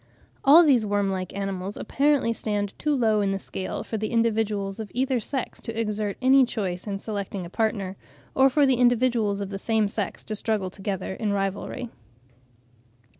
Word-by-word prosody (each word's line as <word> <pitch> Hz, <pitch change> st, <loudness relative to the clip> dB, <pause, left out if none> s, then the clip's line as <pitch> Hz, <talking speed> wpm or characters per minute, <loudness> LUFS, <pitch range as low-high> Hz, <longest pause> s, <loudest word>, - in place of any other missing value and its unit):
All 300 Hz, +5 st, +8 dB
these 265 Hz, -8 st, +4 dB
worm 205 Hz, -1 st, 0 dB
like 185 Hz, -1 st, -3 dB
animals 195 Hz, 0 st, -4 dB
apparently 280 Hz, -4 st, +1 dB
stand 205 Hz, -3 st, -2 dB
too 300 Hz, -1 st, +1 dB
low 220 Hz, -5 st, +2 dB
in 195 Hz, -1 st, +1 dB
the -, -, -1 dB
scale 190 Hz, -1 st, -5 dB
for 220 Hz, -, -4 dB
the 215 Hz, -, -1 dB
individuals 220 Hz, -3 st, 0 dB
of 215 Hz, -2 st, -5 dB
either 260 Hz, 0 st, +1 dB
sex 260 Hz, +3 st, -4 dB
to 225 Hz, 0 st, -5 dB
exert 210 Hz, -2 st, -2 dB
any 265 Hz, +1 st, +6 dB
choice 195 Hz, -6 st, -3 dB
in 200 Hz, -1 st, -2 dB
selecting 200 Hz, -3 st, -5 dB
a 170 Hz, -, -10 dB
partner, 200 Hz, -4 st, -1 dB, 0.4 s
or 265 Hz, +1 st, +5 dB
for 285 Hz, +2 st, +3 dB
the 265 Hz, -2 st, +3 dB
individuals 240 Hz, -4 st, +2 dB
of 200 Hz, -, -4 dB
the 195 Hz, -1 st, -5 dB
same 220 Hz, 0 st, +2 dB
sex 200 Hz, 0 st, -4 dB
to 215 Hz, -, -4 dB
struggle 205 Hz, -3 st, -1 dB
together 195 Hz, -1 st, -4 dB
in 210 Hz, 0 st, -2 dB
rivalry. 200 Hz, +5 st, -3 dB
215 Hz, 175 wpm, -25 LUFS, 195-240 Hz, 0.4 s, All